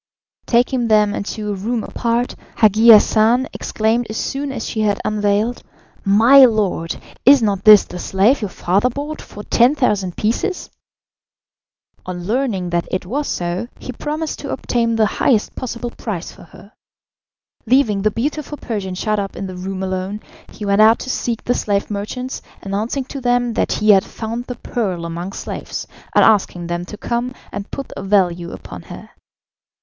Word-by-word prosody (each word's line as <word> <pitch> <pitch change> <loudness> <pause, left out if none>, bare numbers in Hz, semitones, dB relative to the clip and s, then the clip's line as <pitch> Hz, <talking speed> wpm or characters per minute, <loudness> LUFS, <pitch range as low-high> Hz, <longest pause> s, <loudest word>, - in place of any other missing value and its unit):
Taking 240 0 +2
them 210 -2 +3
into 210 0 -4
a - - -1
room 220 +4 -2
apart, 235 +1 -1 0.2
Hagi 220 +2 +5
Hassan 225 +3 +6
exclaimed 225 +2 0
as 215 - -4
soon 275 +1 -3
as 240 -4 -5
she 220 - -4
had 205 -2 +1
unveiled, 210 +3 0 0.4
"My 230 +8 +7
lord, 205 -8 0 0.3
is 270 -1 +7
not 200 -3 0
this 210 -2 +9
the 180 - -9
slave 205 +11 +2
your 210 - -2
father 195 +7 +1
bought 290 +4 -5
for 205 - -10
10,000 230 - +2
pieces?" 300 - -1 1.4
On 180 -1 -5
learning 205 -4 -1
that 170 0 0
it 185 0 -2
was 280 +10 -2
so, 175 +5 -2
he - - -7
promised 300 +5 -4
to 285 - -6
obtain 235 -2 0
the 220 -1 +3
highest 215 +1 +1
possible 240 -1 -5
price 195 -8 -5
for - - -15
her. 200 +4 -16 0.9
Leaving 225 -5 +3
the 215 - +3
beautiful 295 +6 -3
Persian 200 -8 -4
shut 215 +2 -1
up 195 -1 -4
in - - -5
the 185 -1 -7
room 190 +1 -5
alone, 190 +2 -3 0.3
he 210 - -7
went 200 +1 +3
out 220 +1 +6
to 260 - -3
seek 235 -3 -2
the 245 - +1
slave 200 -3 -1
merchants, 250 +6 -4 0.2
announcing 215 +7 -2
to 275 +1 -7
them 245 -1 +1
that - - 0
he 215 0 +4
had 195 -2 +5
found 230 +2 -5
the 250 - -6
pearl 190 -11 -3
among 170 +3 -5
slaves, - - -6 0.3
and - - +6
asking 190 -5 +2
them 175 +1 -3
to 210 - -9
come 240 +3 -3 0.2
and 200 +1 -6
put 275 - -6
a - - -5
value 180 -3 +1
upon - - -9
her. - - -11
215 Hz, 170 wpm, -19 LUFS, 195-245 Hz, 1.4 s, this